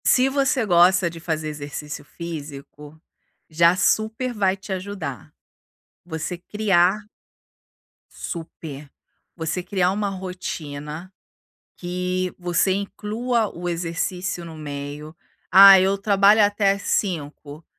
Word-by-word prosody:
Se 260 +1 +4
você 270 -3 +1
gosta 180 -1 +4
de 165 - -10
fazer 160 -2 -3
exercício 150 0 -7
físico, 150 -2 -9 0.5
já 170 +2 +4
super 220 +5 0
vai 195 -3 +1
te 195 0 -6
ajudar. 185 - -6 0.7
Você 165 +1 -5
criar 195 +1 +1 1.1
Super. 155 -4 -8 0.5
Você 165 +2 -3
criar 185 -1 +1
uma 205 +1 -1
rotina, 175 -3 -6 0.6
que 180 0 -3
você 175 +1 +1
inclua 215 +4 -2
o 175 +1 -5
exercício 175 +1 -3
no 165 -1 -9
meio. 145 +1 -7 0.4
Ah, 195 +1 +10
eu 195 +1 +1
trabalho 200 +1 +5
até 205 -1 +2
5. 155 -6 -3
180 Hz, 105 wpm, -23 LUFS, 160-200 Hz, 1.1 s, Ah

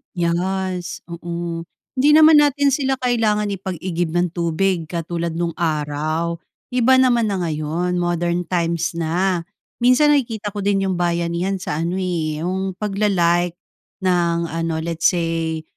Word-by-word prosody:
Yes, 180 +1 -2
oo. 170 0 -5 0.3
Hindi 275 +3 +3
naman 310 -1 +8
natin 285 -1 +3
sila 270 -1 +1
kailangan 220 -5 +1
ipag-igib 175 -3 -3
ng 175 -1 +1
tubig 170 0 0
katulad 170 0 -3
no'ng 170 0 -1
araw. 155 +1 -1 0.3
Iba 250 +1 +4
naman 245 -3 +3
na 200 -2 -1
ngayon, 165 +3 -1
modern 175 0 -1
times 170 -2 -1
na. 170 +2 0 0.4
Minsan 295 +4 +5
nakikita 220 -6 -2
ko 205 - -3
din 195 -1 +1
'yong 185 - 0
bayanihan 175 +2 -1
sa 150 -3 -3
ano, 180 +3 -2
eh, 160 -4 -2
'yong 190 +2 -3
pag-la-like 180 -4 +1 0.5
ng 170 -2 +2
ano 165 0 -2
let's 165 0 +1
say, 165 -2 -2
175 Hz, 135 wpm, -20 LUFS, 170-195 Hz, 0.5 s, naman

